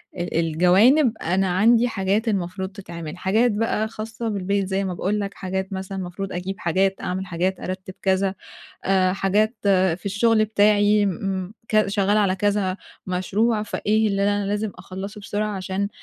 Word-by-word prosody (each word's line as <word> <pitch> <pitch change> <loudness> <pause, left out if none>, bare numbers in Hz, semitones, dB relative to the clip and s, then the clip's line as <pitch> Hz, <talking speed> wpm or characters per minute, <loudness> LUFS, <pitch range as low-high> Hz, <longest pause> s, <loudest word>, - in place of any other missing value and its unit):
أ 175 -2 -2
الجوانب، 190 - +4
أنا 190 +3 +1
عندي 230 +4 +5
حاجات 205 +1 0
المفروض 190 -2 -2
تتعمل، 170 -4 -8
حاجات 220 +6 +2
بقى 220 0 0
خاصّة 225 +1 -5
بالبيت 200 -1 -1
زي 195 +1 -1
ما 190 -2 -2
باقول 200 +4 -1
لك، 200 -1 -3
حاجات 190 +1 -4
مثلًا، 190 +1 -5
مفروض 190 +1 -5
أجيب 185 +2 -4
حاجات، 190 +3 +1
أعمل 190 +1 -3
حاجات، 180 +1 -1
أرتِّب 185 0 -6
كذا، 190 0 +1 0.5
آآ 185 -1 +3
حاجات 205 +4 +1 0.4
في - - -22
الشغل 215 +2 +3
بتاعي 210 0 +3
امم 190 0 -2 0.2
كذ 215 -1 +3
شغّالة 200 +1 +2
على 190 -2 +2
كذا 200 -1 0 0.3
مشروع 210 +5 0
فإيه 215 +1 +1
اللي 200 0 0
أنا 205 0 +1
لازم 210 +1 -1
أخلّصُه 190 +3 -7
بسرعة 205 0 -2
عشان 190 +2 -2
195 Hz, 155 wpm, -23 LUFS, 185-210 Hz, 0.5 s, عندي